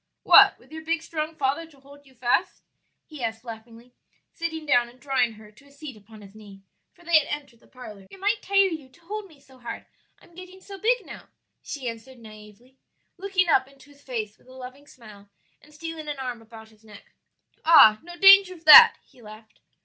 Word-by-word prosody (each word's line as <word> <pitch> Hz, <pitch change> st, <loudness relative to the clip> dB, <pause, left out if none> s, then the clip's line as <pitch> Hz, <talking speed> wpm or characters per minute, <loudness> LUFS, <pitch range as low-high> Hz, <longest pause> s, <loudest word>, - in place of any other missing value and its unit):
"What, -, -, +6 dB
with -, -, -25 dB
your 315 Hz, 0 st, -10 dB
big 330 Hz, +1 st, -3 dB
strong 315 Hz, -1 st, -6 dB
father 290 Hz, +3 st, -3 dB
to 290 Hz, -4 st, -23 dB
hold 285 Hz, +1 st, -19 dB
you 265 Hz, -, -23 dB
fast?" 245 Hz, 0 st, -2 dB, 0.4 s
he 300 Hz, -5 st, -11 dB
asked 225 Hz, 0 st, -5 dB
laughingly, 230 Hz, +1 st, -13 dB, 0.4 s
sitting 325 Hz, -2 st, -6 dB
down 245 Hz, -5 st, +1 dB
and 245 Hz, +1 st, -21 dB
drawing 260 Hz, -5 st, -1 dB
her 215 Hz, -1 st, -17 dB
to 270 Hz, +7 st, -23 dB
a -, -, -22 dB
seat 285 Hz, -2 st, -11 dB
upon 210 Hz, 0 st, -17 dB
his 195 Hz, 0 st, -16 dB
knee; 205 Hz, -2 st, -16 dB, 0.3 s
for 350 Hz, -, -24 dB
they 335 Hz, -2 st, +4 dB
had 290 Hz, -, -7 dB
entered 285 Hz, -6 st, -8 dB
the -, -, -26 dB
parlor. 210 Hz, -6 st, -14 dB
"It 390 Hz, -, -15 dB
might 420 Hz, +2 st, -1 dB
tire 395 Hz, 0 st, +2 dB
you 315 Hz, -8 st, -6 dB
to 255 Hz, -, -25 dB
hold 415 Hz, +4 st, -8 dB
me 310 Hz, -6 st, -22 dB
so 265 Hz, -2 st, -22 dB
hard; 240 Hz, -, -9 dB, 0.3 s
I'm 345 Hz, -, -23 dB
getting 365 Hz, +2 st, -13 dB
so 390 Hz, 0 st, -12 dB
big 480 Hz, +4 st, 0 dB
now," -, -, -13 dB, 0.3 s
she 270 Hz, -4 st, -8 dB
answered 235 Hz, +3 st, -9 dB
naïvely, 215 Hz, +3 st, -17 dB, 0.4 s
looking 380 Hz, -2 st, -1 dB
up 265 Hz, -5 st, +2 dB
into 275 Hz, +1 st, -21 dB
his 285 Hz, 0 st, -23 dB
face 220 Hz, -6 st, -7 dB
with -, -, -28 dB
a 255 Hz, -, -16 dB
loving 260 Hz, +2 st, -13 dB
smile 210 Hz, -6 st, -17 dB, 0.3 s
and 300 Hz, -, -22 dB
stealing 315 Hz, 0 st, -9 dB
an 295 Hz, -1 st, -5 dB
arm 250 Hz, -3 st, -7 dB
about 220 Hz, 0 st, -15 dB
his 215 Hz, 0 st, -26 dB
neck. 210 Hz, -2 st, -17 dB, 0.5 s
"Ah, 220 Hz, -10 st, +6 dB
no 350 Hz, +1 st, -13 dB
danger 390 Hz, 0 st, +6 dB
of 330 Hz, -2 st, -20 dB
that," 460 Hz, +9 st, +9 dB
he 245 Hz, -, -23 dB
laughed. 215 Hz, 0 st, -16 dB
270 Hz, 210 wpm, -24 LUFS, 225-325 Hz, 0.5 s, that